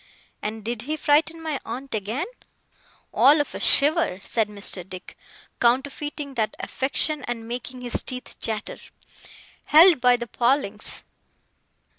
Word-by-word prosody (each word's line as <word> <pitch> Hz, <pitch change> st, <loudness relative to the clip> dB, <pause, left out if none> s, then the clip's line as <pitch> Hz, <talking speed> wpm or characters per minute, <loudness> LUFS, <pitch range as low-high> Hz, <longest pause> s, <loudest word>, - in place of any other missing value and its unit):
'And 215 Hz, 0 st, -5 dB
did 235 Hz, -1 st, -3 dB
he 310 Hz, -, 0 dB
frighten 310 Hz, +3 st, +2 dB
my 310 Hz, -3 st, -2 dB
aunt 260 Hz, +4 st, -6 dB
again?' 220 Hz, +6 st, -2 dB, 0.9 s
'All 295 Hz, +3 st, +6 dB
of 290 Hz, -, -1 dB
a -, -, -5 dB
shiver,' 300 Hz, -, +2 dB
said 220 Hz, -3 st, 0 dB
Mr. 200 Hz, -3 st, -3 dB
Dick, 185 Hz, 0 st, -10 dB, 0.4 s
counterfeiting 280 Hz, +3 st, 0 dB
that 220 Hz, -4 st, -1 dB
affection 285 Hz, +2 st, -2 dB
and 230 Hz, -2 st, -4 dB
making 250 Hz, +1 st, -5 dB
his 245 Hz, -1 st, -1 dB
teeth 255 Hz, -1 st, -5 dB
chatter. 220 Hz, -1 st, -3 dB, 0.9 s
'Held 320 Hz, -1 st, +7 dB
by 250 Hz, 0 st, +5 dB
the 240 Hz, -, -4 dB
palings. 235 Hz, -2 st, -1 dB
250 Hz, 130 wpm, -24 LUFS, 225-290 Hz, 0.9 s, Held